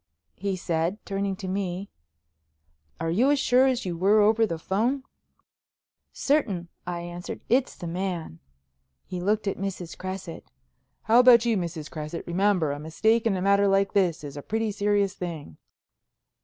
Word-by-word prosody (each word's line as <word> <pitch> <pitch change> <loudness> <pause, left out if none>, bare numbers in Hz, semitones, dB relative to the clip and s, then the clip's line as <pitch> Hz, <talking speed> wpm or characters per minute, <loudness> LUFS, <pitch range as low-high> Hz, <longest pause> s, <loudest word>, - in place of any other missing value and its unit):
he 195 0 -2
said, 170 +1 -1
turning 195 -1 -2
to 190 - -7
me, 190 0 -3 1.1
"are 165 0 -1
you 235 +11 +3
as 290 - +4
sure 260 0 +4
as 255 -3 0
you 175 -2 -2
were 195 +5 +4
over 220 +2 +4
the 165 - -3
phone?" 230 +11 0 1.1
"Certain," 200 - 0 0.2
I 175 -1 -3
answered. 175 +1 -7
"It's 255 +3 +2
the - - -8
man." 170 - -4 0.7
He 180 -1 -5
looked 210 +3 0
at 195 - -2
Mrs. 185 -3 -5
Cresset. 185 -2 -7 0.5
"How 225 +2 +5
about 245 -2 +7
you, 230 -2 +2
Mrs. 170 -5 -4
Cresset? 155 +1 -6
Remember, 180 -3 +1
a 145 - -4
mistake 220 +9 +1
in 195 -4 +1
a 180 - -2
matter 200 0 +4
like 195 0 +2
this 180 -7 +1
is 140 -1 -7
a 145 - -6
pretty 220 +5 -1
serious 205 -1 +1
thing." 165 - -7
195 Hz, 160 wpm, -26 LUFS, 175-215 Hz, 1.1 s, about